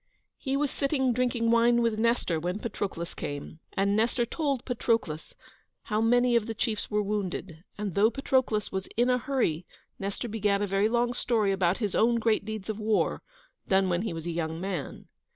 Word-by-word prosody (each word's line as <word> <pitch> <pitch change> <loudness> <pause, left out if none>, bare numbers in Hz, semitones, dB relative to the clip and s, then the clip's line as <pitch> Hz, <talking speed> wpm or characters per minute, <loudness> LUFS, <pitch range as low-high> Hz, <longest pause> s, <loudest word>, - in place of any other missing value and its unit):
He 270 -1 -1
was 290 -1 0
sitting 270 -3 +1
drinking 240 -2 +1
wine 235 +1 +4
with 225 -2 +1
Nestor 230 -8 +1
when 180 +4 -2
Patroclus 200 -6 -4
came, 145 +2 -6
and 200 +1 +1
Nestor 235 +2 +2
told 275 -1 -2
Patroclus 225 -10 -1 0.5
how 215 +1 0
many 245 +1 +4
of 230 -2 +2
the 225 - -4
chiefs 220 -3 -2
were 210 0 +1
wounded, 195 -5 -3
and 205 -3 -3
though 210 +5 +4
Patroclus 260 -5 0
was 190 0 -3
in 245 +2 +4
a 250 - +2
hurry 235 - 0 0.4
Nestor 200 +5 -3
began 210 -2 +1
a 205 - +1
very 200 +2 +2
long 240 +1 +1
story 225 -4 +1
about 190 -1 +2
his 210 -5 -2
own 235 +2 +3
great 225 -2 +2
deeds 215 -2 -5
of 220 -1 -3
war, 215 0 +1 0.5
done 190 -1 +3
when 175 0 +1
he 220 - -2
was 165 -1 -6
a 170 - -2
young 165 -1 -3
man. 185 -6 -4
215 Hz, 190 wpm, -28 LUFS, 195-240 Hz, 0.5 s, wine